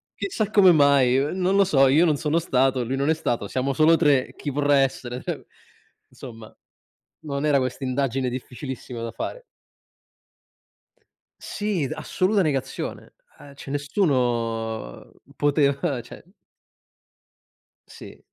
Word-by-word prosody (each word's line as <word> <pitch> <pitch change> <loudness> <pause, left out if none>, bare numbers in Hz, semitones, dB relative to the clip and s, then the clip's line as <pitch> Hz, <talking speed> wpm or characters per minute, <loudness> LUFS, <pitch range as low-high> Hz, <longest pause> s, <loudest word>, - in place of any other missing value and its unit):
"Chissà 215 - -2
come 190 -3 +6
mai, 140 -4 +4
ehm, 145 +7 -1
non 185 +1 +1
lo 200 - +5
so, 135 -6 +4
io 150 +6 +4
non 150 -3 +2
sono 155 +2 0
stato, 130 -4 +1
lui 130 +3 -3
non 140 +3 0
è - - +5
stato, 120 -9 -2
siamo 130 +4 -1
solo 160 +4 +5
3, 145 -5 +2
chi 145 - -5
vorrà 145 0 +2
essere?" 130 -2 -2
Cioè, - - -5 0.7
insomma, 115 -4 -11 0.7
non 140 -1 -4
era 145 -2 +3
questa 130 +1 -3
indagine 130 -1 -1
difficilissima 125 -1 -7
da 115 - -4
fare. - - -6 2.0
Sì, 200 -9 -2
d - - -9
assoluta 195 +2 0
negazione. 140 -6 -3 0.3
Eh 140 -1 -13
cioè 135 - -11
nessuno 120 - -2 0.2
poteva 140 -3 +1
cioè 115 - -13 1.6
Sì. - - -13
140 Hz, 130 wpm, -23 LUFS, 125-155 Hz, 2.0 s, come